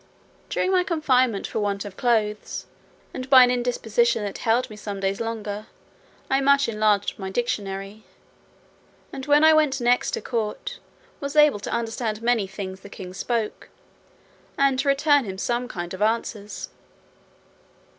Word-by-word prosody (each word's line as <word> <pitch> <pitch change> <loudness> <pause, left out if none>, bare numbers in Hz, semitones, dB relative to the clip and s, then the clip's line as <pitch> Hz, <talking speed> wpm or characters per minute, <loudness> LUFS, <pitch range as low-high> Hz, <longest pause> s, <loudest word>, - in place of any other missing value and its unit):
During 370 - 0
my 365 -1 +3
confinement 255 - +1
for - - -3
want 200 -1 -1
of 200 -2 -8
clothes, 215 -3 0 0.5
and 255 +1 -6
by 260 -2 +9
an 245 - +3
indisposition 235 -2 +1
that 200 -1 -5
held 235 +2 +1
me 215 - -10
some 205 -1 -6
days 195 +2 -1
longer, 215 -2 -4 0.6
I 270 0 +2
much 280 0 +4
enlarged 215 -3 +1
my 190 -1 -4
dictionary; 200 -2 -3 1.1
and 265 0 -6
when 295 +1 +5
I 315 0 +8
went 305 -3 +3
next 245 0 +2
to - - -5
court, 220 -4 -3 0.4
was 280 0 -5
able 300 -7 +5
to - - -6
understand 225 -1 -2
many 235 -4 +2
things 190 -1 -7
the 200 - -12
king 185 -2 -9
spoke, 225 +2 -3 0.9
and 275 -2 +3
to 280 - -1
return 285 +1 +4
him 190 -2 -6
some 240 +5 -1
kind 175 -6 -6
of 185 - -7
answers. 215 -1 -2
230 Hz, 155 wpm, -24 LUFS, 205-260 Hz, 1.1 s, by